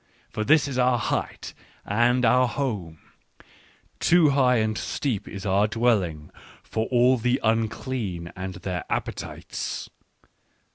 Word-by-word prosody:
" - - -35
For 110 - -1
this 150 +5 +4
is 130 -2 -3
our 125 0 +3
height - - -3 0.3
and 120 +4 +2
our 125 +2 +4
home: 105 - -3 1.0
too 170 -3 +5
high 130 -2 +3
and 110 -1 +1
steep 120 -2 -3
is 100 0 -7
our 100 +2 +3
dwelling 105 -10 0 0.3
for 110 0 -2
all 125 +1 +4
the 125 +2 +1
unclean 110 -5 -2
and 95 0 -5
their 90 -2 -4
appetites. - - -4
115 Hz, 130 wpm, -25 LUFS, 100-125 Hz, 1.0 s, too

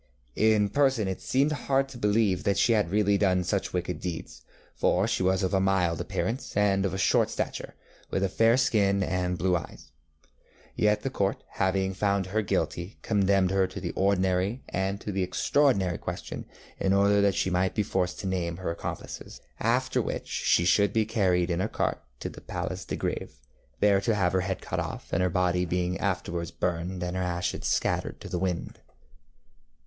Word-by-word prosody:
In 110 -1 +3
person 130 -3 +2
it 95 - -4
seemed 140 +3 +2
hard 135 -2 +1
to 135 - -10
believe 105 -3 +2
that 100 -1 +1
she 115 - +4
had 105 -6 +2
really 100 0 +2
done 90 -3 +2
such 95 +3 -1
wicked 90 0 -2
deeds, 90 -3 -6 0.3
for 95 +4 +2
she 115 - 0
was 95 +1 +2
of 95 - 0
a 95 - +4
mild 95 -4 +1
appearance, 120 -2 -3
and 100 -1 +3
of 95 0 -4
short - - +3
stature, - - -4 0.3
with 95 - -1
a - - +3
fair 115 +5 +3
skin 100 -6 +2
and 90 -1 -1
blue 90 0 +2
eyes. 85 - -7 0.8
Yet 105 0 +2
the 135 - -2
Court, 100 -6 -1
having 95 0 0
found 100 0 +1
her 105 +4 0
guilty, 95 -2 -2
condemned 100 -3 +2
her 95 -1 +2
to 95 - -7
the 90 -2 -3
ordinary 95 +4 +1
and 95 +2 -1
to 105 - -4
the 95 -1 -1
extraordinary 95 - +2
question - - -6 0.3
in 95 - +2
order 100 +1 +4
that 100 -1 +3
she 95 - 0
might 90 +1 +1
be 105 - +2
forced 90 -2 -1
to 95 - -4
name 85 -3 -2
her 90 -2 -3
accomplices, 85 - -7 0.2
after - - +1
which - - -4
she 85 - +2
should 100 +3 +3
be 110 -1 +2
carried 95 -5 +1
in 85 +1 0
a 105 - -1
cart - - -1 0.2
to - - -3
the - - -9
Place - - -4
de - - -4
Gr├©ve, - - -3 0.5
there 100 -1 +4
to 110 +2 +1
have 95 -3 +1
her 95 - +2
head 95 0 -3
cut - - -3
off, - - -5
her 90 -1 +2
body 90 0 +1
being 90 +1 -1
afterwards 85 -4 -2
burned 90 +1 -2
and 90 +1 -3
her 95 - -1
ashes 90 -1 -2
scattered - - 0
to - - -9
the 90 - -2
winds. 90 -2 -3
95 Hz, 190 wpm, -27 LUFS, 90-105 Hz, 0.8 s, she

